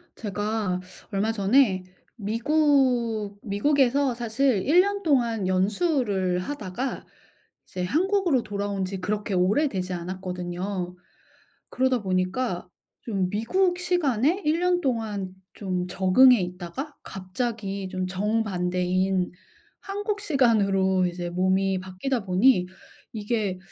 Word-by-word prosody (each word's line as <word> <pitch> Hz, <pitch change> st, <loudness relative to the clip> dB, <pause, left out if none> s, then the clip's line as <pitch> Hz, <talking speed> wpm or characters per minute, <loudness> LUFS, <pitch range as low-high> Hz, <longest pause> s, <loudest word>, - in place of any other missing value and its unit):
제가 210 Hz, -2 st, -2 dB, 0.3 s
얼마 205 Hz, +2 st, 0 dB
전에 205 Hz, -2 st, +3 dB, 0.3 s
미국 235 Hz, -3 st, +1 dB
미국에서 265 Hz, +5 st, +2 dB
사실 240 Hz, -1 st, +1 dB
1 325 Hz, +5 st, +6 dB
년 400 Hz, +1 st, -2 dB
동안 235 Hz, -, +1 dB
연수를 195 Hz, -, +1 dB
하다가 230 Hz, +3 st, -4 dB, 0.6 s
이제 180 Hz, -, -4 dB
한국으로 350 Hz, -, +2 dB
돌아온 200 Hz, -2 st, -3 dB
지 190 Hz, 0 st, -5 dB
그렇게 210 Hz, +2 st, -2 dB
오래되지 190 Hz, +1 st, +1 dB
않았거든요. 180 Hz, +1 st, -4 dB, 0.8 s
그러다 260 Hz, -3 st, +1 dB
보니까 185 Hz, +1 st, -1 dB, 0.4 s
좀 195 Hz, -5 st, -1 dB
미국 355 Hz, -, +1 dB
시간에 345 Hz, -, +1 dB
1 315 Hz, +3 st, +2 dB
년 360 Hz, 0 st, +2 dB
동안 215 Hz, -, -2 dB, 0.2 s
좀 185 Hz, -3 st, -3 dB
적응해 195 Hz, +7 st, +5 dB
있다가 180 Hz, -, -6 dB
갑자기 195 Hz, 0 st, -4 dB
좀 185 Hz, 0 st, -3 dB
정반대인 185 Hz, -2 st, 0 dB, 0.5 s
한국 410 Hz, +1 st, -3 dB
시간으로 200 Hz, -, +2 dB
이제 175 Hz, 0 st, -4 dB
몸이 190 Hz, +2 st, +1 dB
바뀌다 190 Hz, +6 st, -3 dB
보니 185 Hz, +1 st, +4 dB, 0.5 s
이게 210 Hz, -3 st, -2 dB
205 Hz, 235 characters per minute, -25 LUFS, 185-260 Hz, 0.8 s, 1